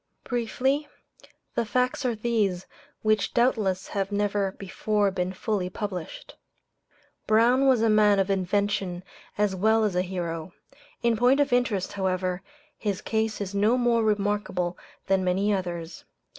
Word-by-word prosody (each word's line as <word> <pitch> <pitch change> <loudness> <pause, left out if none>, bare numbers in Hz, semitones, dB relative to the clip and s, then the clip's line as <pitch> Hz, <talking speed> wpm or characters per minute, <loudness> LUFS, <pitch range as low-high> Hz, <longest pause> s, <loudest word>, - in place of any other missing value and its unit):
Briefly, 265 +4 -1 0.7
the 235 - 0
facts 250 +4 0
are 240 -2 +1
these, 210 -5 0 0.4
which 215 -1 +1
doubtless 215 -6 +1
have 195 0 -2
never 205 -1 0
before 205 +1 -1
been 185 -1 -2
fully 190 -1 -2
published 185 -4 -6 0.9
Brown 240 +5 +4
was 250 -4 +4
a - - +4
man 210 -1 +5
of 195 0 +1
invention 190 -1 -1 0.3
as 205 -2 +1
well 220 +4 +3
as 205 -4 0
a 180 - +3
hero. 175 -2 -4 0.5
In 235 -1 +3
point 250 +5 +4
of 285 -3 +2
interest, 230 -7 0
however, 185 -2 -1 0.4
his 205 -3 -2
case 220 0 -1
is 200 -1 -4
no 210 +5 +3
more 240 -2 +2
remarkable 205 -4 0 0.3
than 190 -1 +2
many 195 +3 +1
others. 175 -3 -4
205 Hz, 140 wpm, -26 LUFS, 185-225 Hz, 0.9 s, man